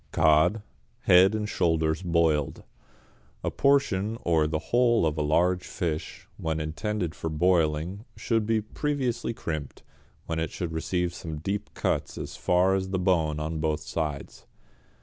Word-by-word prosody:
=Cod, 80 +8 +3 0.4
Head 95 +4 +6
and 105 -1 -2
Shoulders 80 -4 +1
Boiled.= 85 -5 +1 0.8
A - - -1
portion 115 -7 +2
or 80 -3 +2
the 80 +1 -1 0.2
whole 120 -5 +4
of 75 -2 0
a 75 - -1
large 90 +4 +2
fish, 80 -3 -4
when 80 0 -2
intended 85 +3 -2
for 80 - -4
boiling, 85 +3 +1
should 115 -3 0
be 110 -1 +2
previously 125 0 -2
crimped, 75 -8 -5 0.4
when 80 -1 -2
it 80 -1 -1
should 85 -2 -4
receive 90 +2 -1
some 80 -3 -6
deep 100 +7 -4
cuts - - -1
as - - -6
far 90 +2 +2
as 95 -1 -1
the 95 - -1
bone 85 -5 +1
on 80 +1 -3
both 75 -1 0
sides. 75 -2 -5
85 Hz, 150 wpm, -27 LUFS, 80-100 Hz, 0.8 s, Head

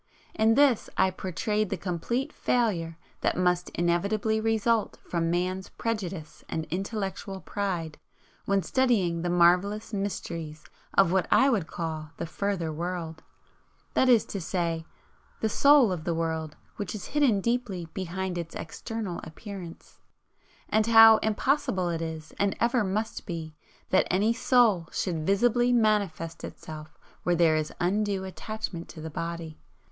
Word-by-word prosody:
In 220 +1 +3
this 280 -5 +4
I 190 0 +4
portrayed 210 +3 -2
the - - -2
complete 200 +9 -2
failure 175 -10 0 0.2
that - - 0
must 180 -1 +1
inevitably 200 +6 +1
result 225 0 +1
from 165 -1 0
man's 185 +2 -1
prejudice 190 -8 -4
and 160 - -2
intellectual 195 0 -3
pride 180 -6 -3 0.5
when 195 -1 +1
studying 205 -11 +1
the 175 - -1
marvellous 180 +6 +3
mysteries 170 -6 -4 0.3
of 195 -3 +5
what 190 -1 +2
I 270 +1 +5
would 195 -9 0
call 160 -2 -4
the 170 - -3
Further 175 -2 -2
World, 165 -1 -4 0.7
that 260 - +3
is 235 -3 +5
to 200 - -3
say, 165 -2 -2 0.5
the 220 - 0
'Soul' 280 -2 +5
of 175 -4 -3
the 170 0 -1
world 160 -2 -2 0.2
which 205 0 -4
is 205 - -7
hidden 275 -9 +3
deeply 230 -5 -1
behind 185 0 -3
its 165 -1 -6
external 200 +3 -5
Appearance, 180 0 -9 0.7
and 215 +1 +2
how 225 -1 +9
impossible 215 -4 0
it 165 -1 -2
is 160 -1 -6
and 200 -1 +1
ever 235 0 +2
must 210 +4 -3
be 165 -3 -5 0.4
that 190 - +4
any 205 +5 +2
'Soul' 230 -8 +3
should 165 -4 -2
visibly 240 +5 +3
manifest 200 -8 +1
itself 155 -1 -9 0.2
where 175 - +1
there 165 -2 +4
is 155 -1 -1
undue 200 +1 0
attachment 190 -2 -5
to - - -10
the 160 0 -6
body. 165 0 -5
190 Hz, 140 wpm, -27 LUFS, 170-215 Hz, 0.7 s, how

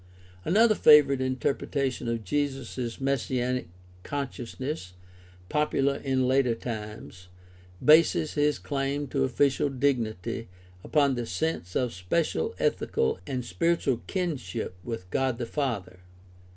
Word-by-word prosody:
Another 215 +5 +5
favorite 145 -7 +6
interpretation 130 0 -1
of 115 -1 -2
Jesus' 135 0 -2
messianic 125 -3 -1 0.3
consciousness, 130 - -5 0.5
popular 140 -1 +1
in 130 -2 0
later 130 -2 +3
times, 105 -5 -7 0.6
bases 155 0 +5
his 150 0 +2
claim 140 0 -2
to 135 -1 +1
official 135 +2 +2
dignity 120 -6 -1 0.4
upon 140 -3 +2
his 120 -2 -4
sense 155 - -2
of 125 -3 0
special 165 - -1
ethical 455 -1 0
and 130 -3 -3
spiritual 165 -4 0
kinship 155 - -3
with 115 -6 -5
God 130 -3 0
the 120 - -3
Father. 115 -10 -3
135 Hz, 110 wpm, -27 LUFS, 120-145 Hz, 0.6 s, favorite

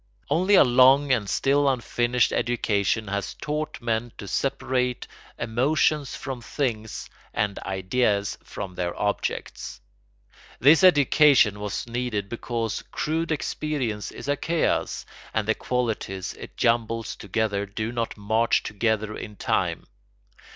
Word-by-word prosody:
Only 185 +5 +4
a - - +8
long 130 +3 +5
and 110 -6 +1
still 140 +1 +2
unfinished 120 -1 +1
education 110 -2 0
has 100 0 -3
taught 150 +1 -4
men 115 0 -1
to 100 - -8
separate 125 0 -1 0.3
emotions 135 +4 +1
from 130 -2 -6
things 115 -4 -3 0.3
and 105 -1 0
ideas 100 +2 0
from 95 -2 -7
their 90 -1 -3
objects. 105 0 -3 0.8
This 150 +8 +6
education 145 - +5
was 105 -1 -3
needed 120 -4 -3
because 115 -1 -3
crude 165 +2 -1
experience 140 -8 -2
is - - -9
a 145 - +2
chaos, 165 +3 0 0.3
and 110 -1 0
the 110 - +4
qualities 110 -7 -2
it - - -11
jumbles 115 -1 0
together 100 0 -1
do 110 +3 -3
not 115 -2 -3
march 110 +3 +2
together 110 0 -1
in 105 - -7
time. - - -1
115 Hz, 125 wpm, -25 LUFS, 105-135 Hz, 0.8 s, a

